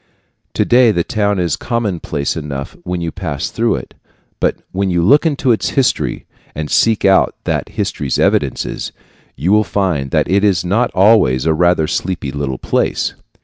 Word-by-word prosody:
Today, 120 -1 +4
the 85 -4 0
town 105 +1 0
is 85 -4 0
commonplace 95 - -2
enough 70 -4 -5
when 90 -1 -4
you 85 -1 -3
pass - - -4
through - - +1
it, - - -8 0.5
but - - +1 0.2
when 95 +1 -1
you 90 -1 +1
look 145 - +5
into 140 -4 +1
its 110 - +1
history, 135 - 0 0.3
and 75 -1 -4
seek 110 -3 +2
out 95 -1 +4
that - - -2
history's 70 -2 -2
evidences, - - 0 0.4
you 90 - -1
will 105 +1 +5
find 90 -11 -1
that - - +1
it 100 +2 +2
was 95 -5 +2
not 115 +7 +1
always 95 - +4
a 80 - +3
rather 85 0 +2
sleepy 85 -3 -3
little 70 -2 -3
place. - - -1
90 Hz, 165 wpm, -16 LUFS, 80-105 Hz, 0.5 s, look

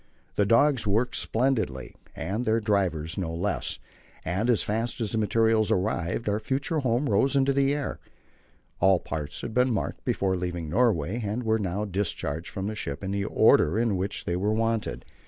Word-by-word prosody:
The 100 - +1
dogs 115 0 +3
worked 115 +5 +1
splendidly, 110 - 0 0.2
and 105 +5 -3
their 110 -1 +2
drivers 95 -5 0
no 85 -3 -2
less, 90 +5 -2 0.5
and 95 +8 -1
as 120 - +3
fast 115 +4 -2
as 110 -4 -1
the 110 - 0
materials 110 0 +2
arrived 90 +2 -1
our 105 +1 +1
future 140 +7 -1
home 130 +1 +1
rose 140 0 +2
into 135 0 +3
the 140 0 +2
air. 145 -2 -4 0.8
All 95 0 +5
the - - -11
parts 75 -2 -4
had 115 - -5
been 125 +1 +3
marked 110 - -3
before 95 -1 0
leaving 90 -3 -4
Norway, 110 -2 +1
and 105 +4 -2
were 110 0 +1
now 100 +1 -2
discharged 85 -5 -3
from 95 - -4
the 105 - -2
ship 70 -9 -5
in 95 - -3
the 100 0 -1
order 80 -1 +4
in 115 -3 +1
which 95 +2 -3
they 85 - -1
were 100 +4 0
wanted. 115 0 -1
105 Hz, 185 wpm, -27 LUFS, 95-115 Hz, 0.8 s, All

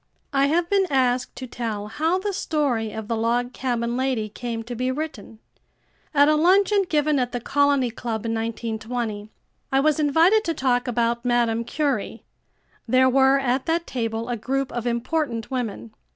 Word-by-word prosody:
I 275 0 +3
have 335 +3 +1
been 390 0 +2
asked 255 -2 +1
to 260 - -6
tell 225 -4 -4
how 315 - 0
the 400 +2 -3
story 275 - -1
of 220 0 -6
The 230 - -1
Log 240 +2 0
Cabin 240 -2 -2
Lady 255 -4 -1
came 230 +1 -5
to 240 +2 -7
be 255 +2 -1
written. 260 -6 -5 0.7
At 285 -1 +5
a 305 - +5
luncheon 390 +5 +4
given 300 -2 +2
at 245 0 -1
the 245 - -1
Colony 280 -1 +2
Club 225 -1 -4
in 225 - -1
1920, 225 -1 -3 0.4
I 270 - +3
was 305 +2 +2
invited 330 +9 +4
to 330 - -1
talk 255 -2 +1
about 235 0 0
Madame 240 -2 +1
Curie. 285 +3 -2 0.6
There 255 +2 +4
were, 265 +1 +5
at 265 +1 0
that 335 +1 0
table, 230 -2 -3
a 245 - -1
group 270 +4 -2
of 240 0 -3
important 240 0 -2
women. 215 - -4
250 Hz, 170 wpm, -23 LUFS, 230-290 Hz, 0.7 s, At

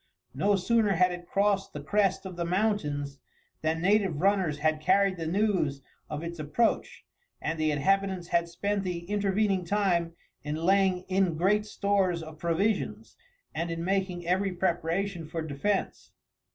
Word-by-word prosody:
No 205 0 +2
sooner 210 +1 +2
had 180 +1 +3
it 175 0 -7
crossed 200 0 +1
the 150 - -5
crest 195 +6 +1
of 185 -2 -6
the 170 - -2
mountains 165 -7 -1 0.4
than 160 +1 -1
native 195 -5 +2
runners 190 -5 +2
had 155 +1 0
carried 195 +3 +3
the 165 -2 -4
news 175 -7 0 0.3
of 150 +1 -4
its 170 0 -6
approach, 155 +10 0 0.3
and 160 0 -3
the 155 0 +2
inhabitants 190 +4 0
had 170 0 +1
spent 200 +4 -1
the 175 -2 -4
intervening 200 -1 +1
time 175 -3 +1 0.3
in 150 +1 -3
laying 185 +2 +2
in 185 -3 +1
great 210 +5 +2
stores 195 -5 0
of 155 -1 -11
provisions, 185 +6 -1 0.4
and 170 +1 -2
in 165 0 -3
making 190 -2 -1
every 190 +2 +1
preparation 175 0 -1
for 165 0 -4
defence. 160 +7 -2
180 Hz, 150 wpm, -28 LUFS, 165-200 Hz, 0.4 s, had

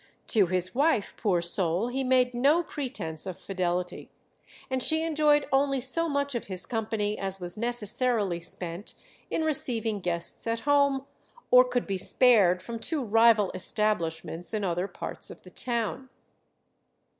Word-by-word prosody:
To 205 -5 +4
his 185 +1 0
wife, 275 -6 +1
poor 180 -6 0
soul, 175 +4 +1
he 265 +2 -2
made 255 -1 +2
no 285 +8 +3
pretence 210 - -6
of 185 - -5
fidelity, 180 -2 -3 0.6
and 260 -1 -2
she 315 +5 +4
enjoyed 300 -2 +2
only 275 0 +2
so 320 +7 +1
much 280 -1 -1
of 235 - -4
his 185 -2 +1
company 215 -2 -2
as 195 0 -4
was 175 -1 -2
necessarily 230 -4 +1
spent 170 +2 -5 0.3
in 320 - -1
receiving 235 -8 -1
guests 175 +3 -3
at 230 0 -1
home, 280 -1 +2 0.5
or 250 0 +8
could 245 -1 -2
be 195 -2 -3
spared 195 -6 +4
from 230 +2 -6
two 300 +3 -2
rival 225 -2 +4
establishments 175 -2 -2
in 210 - -2
other 180 0 -1
parts - - -5
of - - -12
the - - -14
town. 240 +2 -3
225 Hz, 150 wpm, -27 LUFS, 185-260 Hz, 0.6 s, or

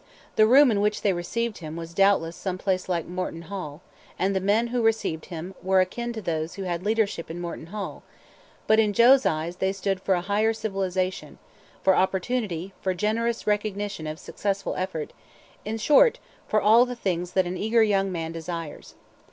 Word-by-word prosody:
The 215 - +6
room 265 +2 +7
in 200 -2 +1
which 210 0 0
they 200 - +3
received 220 +6 -3
him 155 -2 -7
was 165 0 -7
doubtless 195 -3 +3
some 185 -2 -4
place 185 -1 -1
like 170 -3 0
Morton 180 -1 -5
Hall, 165 -4 -7 0.3
and 195 +1 0
the - - +2
men 210 +5 +1
who 245 0 0
received 220 -8 0
him 175 +1 -7
were 190 0 +3
akin 235 +6 -1
to 220 -2 -6
those 160 -1 -2
who 195 - -5
had 175 -1 -3
leadership 210 -5 0
in 165 +2 -6
Morton 170 -2 -6
Hall; 205 +2 -6 0.6
but 220 0 +4
in 210 -2 +3
Joe's 255 +5 +6
eyes 165 +1 -2
they 190 0 +1
stood 195 -1 -2
for 190 - +2
a 175 - -1
higher 210 +4 +1
civilization, 190 -4 -3 0.5
for 190 -1 +5
opportunity, 190 -2 -1
for 185 -1 -1
generous 225 +4 -1
recognition 205 -4 -2
of 155 0 -5
successful 200 +3 -3
effort 185 -5 -4 0.5
in 220 +2 -3
short, 300 - +5 0.3
for 215 - +2
all 220 +4 +6
the 250 - -5
things 180 -5 -2
that 190 -1 +3
an 175 +1 -3
eager 220 +4 +3
young 195 -2 +1
man 165 -2 -3
desires. 165 -1 -7
195 Hz, 185 wpm, -25 LUFS, 175-215 Hz, 0.6 s, room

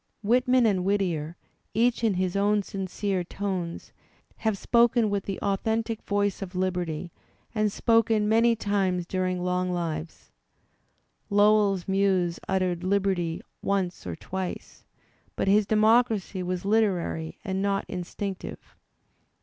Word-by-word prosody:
Whitman 250 +3 +3
and 195 -4 +2
Whittier, 175 -5 -1 0.4
each 235 +1 +2
in 215 -4 +2
his 185 0 -1
own 205 +1 +2
sincere 195 0 -2
tones, 185 -2 -4 0.4
have 220 -3 0
spoken 235 0 +3
with 200 -1 -1
the 195 - -3
au 200 -1 +1
thentic 225 +1 -2
voice 205 -1 -1
of 190 -1 -6
liberty 180 -3 -2 0.4
and 215 -2 +1
spoken 225 -1 +2
many 230 +2 +4
times 195 -4 0
during 185 0 -1
long 180 0 0
lives. 160 - -4 1.0
Lowell's 205 -2 +3
muse 190 -3 +1
uttered 185 -2 0
liberty 185 -3 0 0.2
once 190 - -1
or 85 - -4
twice, 190 - -6 0.5
but - - -1
his 205 +1 +4
democracy 215 -3 +3
was 180 +1 -3
literary 190 -7 0
and 190 -1 -1
not 200 0 0
instinctive. 185 +2 -6
195 Hz, 125 wpm, -26 LUFS, 180-210 Hz, 1.0 s, many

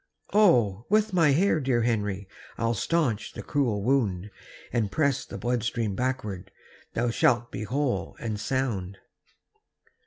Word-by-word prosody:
"Oh, 120 - +4
with 215 0 +2
my 165 -4 +4
hair, 160 +4 +3
dear 130 -4 +1
Henry, 105 -4 -1 0.3
I'll 115 0 +1
staunch 120 -3 0
the - - -7
cruel 120 -9 0
wound, 105 -7 0 0.4
And 110 -5 0
press 140 +1 +1
the - - -8
blood 120 0 -1
stream 115 -3 -1
backward; 110 -7 -3 0.5
Thou 120 +1 +1
shalt 120 0 +2
be 105 - -4
whole 135 +3 -2
and 110 -3 -3
sound." 105 -5 -2
120 Hz, 135 wpm, -27 LUFS, 105-135 Hz, 0.5 s, Oh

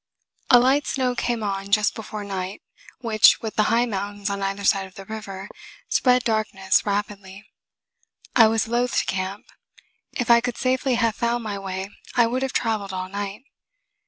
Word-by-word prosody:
A 245 - +9
light 270 +4 +2
snow 255 -2 0
came 235 -2 -2
on 195 -1 -3
just 210 +1 +3
before 215 -1 -7
night, 190 -1 -5 0.4
which, 220 -3 +5
with 220 -1 -5
the 215 - +3
high 235 +2 +3
mountains 205 -2 -4
on 200 0 -3
either 195 +1 -2
side 195 -1 +2
of 190 - -20
the 195 - -10
river, 200 -3 -7 0.4
spread 250 -1 +3
darkness 210 -4 +1
rapidly. 200 -1 -4 0.9
I 225 -3 +8
was 225 0 +1
loath 240 +1 0
to - - +2
camp. 190 +2 -3 0.7
If 245 -2 0
I 235 0 +7
could 245 -1 -3
safely 255 0 +1
have 230 -2 +1
found 235 0 -1
my 205 -2 -4
way, 190 0 -5 0.2
I 240 - +5
would 250 +3 -1
have 265 -1 -1
traveled 210 -4 -1
all 185 0 -4
night. 200 +3 -5
215 Hz, 175 wpm, -23 LUFS, 195-235 Hz, 0.9 s, A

